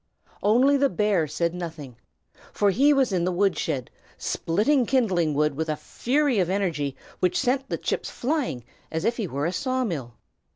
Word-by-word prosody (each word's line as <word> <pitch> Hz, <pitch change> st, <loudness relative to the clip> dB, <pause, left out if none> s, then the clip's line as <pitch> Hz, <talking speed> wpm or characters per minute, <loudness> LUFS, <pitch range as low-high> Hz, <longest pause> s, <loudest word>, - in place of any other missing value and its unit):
Only 255 Hz, +7 st, +4 dB
the 275 Hz, 0 st, +3 dB
bear 205 Hz, -8 st, +1 dB
said 170 Hz, +3 st, -1 dB
nothing, 160 Hz, -8 st, -7 dB, 0.6 s
for 205 Hz, -1 st, +2 dB
he 280 Hz, +9 st, +4 dB
was 270 Hz, -5 st, +3 dB
in 180 Hz, -3 st, +1 dB
the 180 Hz, -, +1 dB
wood 190 Hz, +1 st, +2 dB
shed, 135 Hz, -7 st, -3 dB, 0.3 s
splitting 230 Hz, -, +1 dB
kindling 185 Hz, -, +2 dB
wood 150 Hz, 0 st, +2 dB
with 160 Hz, +3 st, -3 dB
a 155 Hz, -, +1 dB
fury 265 Hz, -, 0 dB
of 180 Hz, -2 st, +1 dB
energy 165 Hz, -8 st, -1 dB, 0.2 s
which 180 Hz, -1 st, +1 dB
sent 270 Hz, +1 st, 0 dB
the -, -, -1 dB
chips -, -, -2 dB
flying 255 Hz, -, -2 dB, 0.3 s
as 160 Hz, +2 st, -2 dB
if 235 Hz, -, +1 dB
he 220 Hz, -5 st, -2 dB
were 140 Hz, -1 st, -2 dB
a 175 Hz, -, -1 dB
saw 255 Hz, +6 st, -1 dB
mill. 140 Hz, -, -4 dB
190 Hz, 180 wpm, -25 LUFS, 160-250 Hz, 0.6 s, Only